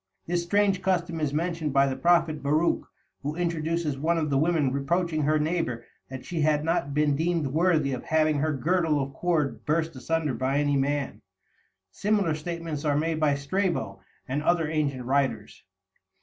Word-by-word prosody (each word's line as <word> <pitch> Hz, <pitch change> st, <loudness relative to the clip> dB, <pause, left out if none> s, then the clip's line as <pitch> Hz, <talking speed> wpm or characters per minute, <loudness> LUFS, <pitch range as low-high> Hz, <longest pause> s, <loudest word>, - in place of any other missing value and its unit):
This 175 Hz, 0 st, 0 dB
strange 195 Hz, +2 st, +1 dB
custom 175 Hz, -3 st, 0 dB
is 150 Hz, -3 st, 0 dB
mentioned 160 Hz, -1 st, -2 dB
by 140 Hz, 0 st, +5 dB
the 135 Hz, -1 st, -1 dB
prophet 165 Hz, +1 st, +2 dB
Baruch, 155 Hz, +4 st, +1 dB, 0.3 s
who 145 Hz, +2 st, -3 dB
introduces 165 Hz, -3 st, -1 dB
one 165 Hz, +3 st, +1 dB
of 155 Hz, -2 st, -1 dB
the 135 Hz, -, +2 dB
women 155 Hz, -4 st, +2 dB
reproaching 160 Hz, +3 st, 0 dB
her 155 Hz, +1 st, +2 dB
neighbor 150 Hz, -7 st, -1 dB, 0.2 s
that 130 Hz, -1 st, -8 dB
she 170 Hz, -3 st, -3 dB
had 150 Hz, 0 st, +2 dB
not 150 Hz, -4 st, -1 dB
been 150 Hz, -1 st, +2 dB
deemed 165 Hz, +1 st, 0 dB
worthy 155 Hz, -1 st, +2 dB
of 125 Hz, -, -5 dB
having 155 Hz, -2 st, +2 dB
her 155 Hz, +2 st, +1 dB
girdle 160 Hz, +2 st, +1 dB
of 135 Hz, 0 st, -3 dB
cord 160 Hz, -3 st, -1 dB
burst 160 Hz, +1 st, 0 dB
asunder 155 Hz, +2 st, -1 dB
by 130 Hz, +3 st, 0 dB
any 145 Hz, -1 st, +2 dB
man. 140 Hz, 0 st, -1 dB, 0.7 s
Similar 205 Hz, -5 st, +1 dB
statements 165 Hz, -1 st, -5 dB
are 145 Hz, -2 st, +1 dB
made 160 Hz, +1 st, 0 dB
by 150 Hz, -2 st, +3 dB
Strabo 140 Hz, -, -2 dB, 0.3 s
and 140 Hz, +3 st, -1 dB
other 165 Hz, 0 st, +2 dB
ancient 145 Hz, -5 st, -1 dB
writers. 135 Hz, +1 st, -1 dB
155 Hz, 170 wpm, -26 LUFS, 140-170 Hz, 0.7 s, by